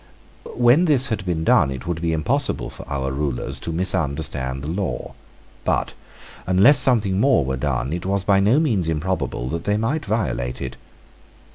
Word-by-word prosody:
When 125 Hz, +8 st, +4 dB
this 140 Hz, -5 st, +4 dB
had 110 Hz, -3 st, -2 dB
been 80 Hz, -3 st, -1 dB
done 75 Hz, -, +4 dB
it 65 Hz, -2 st, -6 dB
would 85 Hz, -1 st, -3 dB
be 85 Hz, -1 st, 0 dB
impossible 125 Hz, -, -1 dB
for -, -, -11 dB
our 65 Hz, -1 st, -2 dB
rulers 65 Hz, -1 st, -3 dB
to 85 Hz, -, -5 dB
misunderstand 70 Hz, -6 st, -2 dB
the -, -, -5 dB
law: 85 Hz, -7 st, -3 dB, 0.5 s
but, -, -, -1 dB, 0.5 s
unless 100 Hz, +10 st, +6 dB
something 110 Hz, -8 st, +3 dB
more 130 Hz, -, +3 dB
were 65 Hz, 0 st, -2 dB
done, 65 Hz, 0 st, -2 dB
it 90 Hz, +2 st, -4 dB
was 100 Hz, -1 st, 0 dB
by 100 Hz, -1 st, +3 dB
no 105 Hz, +9 st, +3 dB
means 110 Hz, -, 0 dB
improbable 75 Hz, -7 st, -2 dB
that 85 Hz, +3 st, -4 dB
they 105 Hz, 0 st, +1 dB
might 120 Hz, +9 st, -1 dB
violate 95 Hz, -, -2 dB
it. -, -, -5 dB
85 Hz, 170 wpm, -21 LUFS, 70-110 Hz, 0.5 s, unless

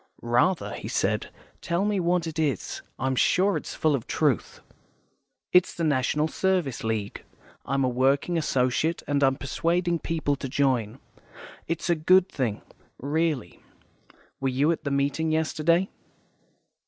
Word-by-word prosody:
"Rather," 125 Hz, +10 st, +1 dB
he -, -, -6 dB
said. -, -, 0 dB, 0.3 s
"Tell 170 Hz, +4 st, 0 dB
me 205 Hz, -2 st, +1 dB
what 175 Hz, -1 st, +1 dB
it 160 Hz, -1 st, -5 dB
is. 145 Hz, -, -1 dB, 0.2 s
I'm 130 Hz, 0 st, -1 dB
sure 190 Hz, +9 st, +3 dB
it's -, -, -5 dB
full 155 Hz, -2 st, +2 dB
of 130 Hz, -5 st, -2 dB
truth." -, -, 0 dB, 0.9 s
"It's 180 Hz, 0 st, +4 dB
the 170 Hz, -, -3 dB
National 150 Hz, +1 st, +1 dB
Service 180 Hz, -7 st, -1 dB
League. 110 Hz, -2 st, -3 dB, 0.4 s
I'm 135 Hz, +1 st, +1 dB
a -, -, +2 dB
working 135 Hz, +7 st, +1 dB
associate, 150 Hz, +1 st, 0 dB
and 145 Hz, -1 st, +1 dB
I'm 135 Hz, 0 st, +4 dB
persuading 170 Hz, +3 st, 0 dB
people 155 Hz, -3 st, -1 dB
to 135 Hz, -, -5 dB
join. 125 Hz, -4 st, 0 dB, 0.7 s
It's 165 Hz, +2 st, -2 dB
a 175 Hz, -, +4 dB
good 180 Hz, +3 st, +4 dB
thing, 120 Hz, -7 st, -2 dB, 0.3 s
really. 145 Hz, -, -2 dB, 0.8 s
Were 135 Hz, -, 0 dB
you 140 Hz, +5 st, +2 dB
at 165 Hz, -, -4 dB
the -, -, 0 dB
meeting 140 Hz, +3 st, 0 dB
yesterday?" 160 Hz, +3 st, +1 dB
150 Hz, 140 wpm, -26 LUFS, 130-170 Hz, 0.9 s, It's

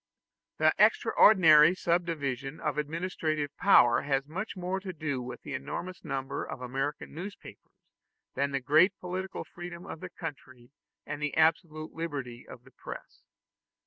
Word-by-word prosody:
The -, -, +4 dB
extraordinary 165 Hz, -5 st, +6 dB
subdivision 155 Hz, -6 st, -2 dB
of 150 Hz, -1 st, -2 dB
administrative 155 Hz, -2 st, -2 dB
power 120 Hz, -11 st, +5 dB
has 135 Hz, -1 st, 0 dB
much 190 Hz, +7 st, -5 dB
more 185 Hz, +1 st, -2 dB
to 190 Hz, -1 st, -6 dB
do 145 Hz, -5 st, -3 dB
with 125 Hz, 0 st, -8 dB
the 145 Hz, -, -6 dB
enormous 160 Hz, +7 st, -5 dB
number 135 Hz, 0 st, -3 dB
of -, -, -7 dB
American 135 Hz, +3 st, -4 dB
newspapers 185 Hz, +6 st, -9 dB, 0.6 s
than 140 Hz, +1 st, 0 dB
the 135 Hz, -1 st, -2 dB
great 155 Hz, +9 st, +4 dB
political 185 Hz, +1 st, -4 dB
freedom 175 Hz, 0 st, -9 dB
of -, -, -7 dB
the -, -, -7 dB
country 130 Hz, -6 st, -9 dB, 0.3 s
and 150 Hz, 0 st, -5 dB
the 150 Hz, -1 st, -2 dB
absolute 155 Hz, -1 st, +1 dB
liberty 140 Hz, -7 st, -5 dB
of 125 Hz, -, -11 dB
the 135 Hz, -, -18 dB
press. -, -, -10 dB
155 Hz, 145 wpm, -29 LUFS, 135-175 Hz, 0.6 s, extraordinary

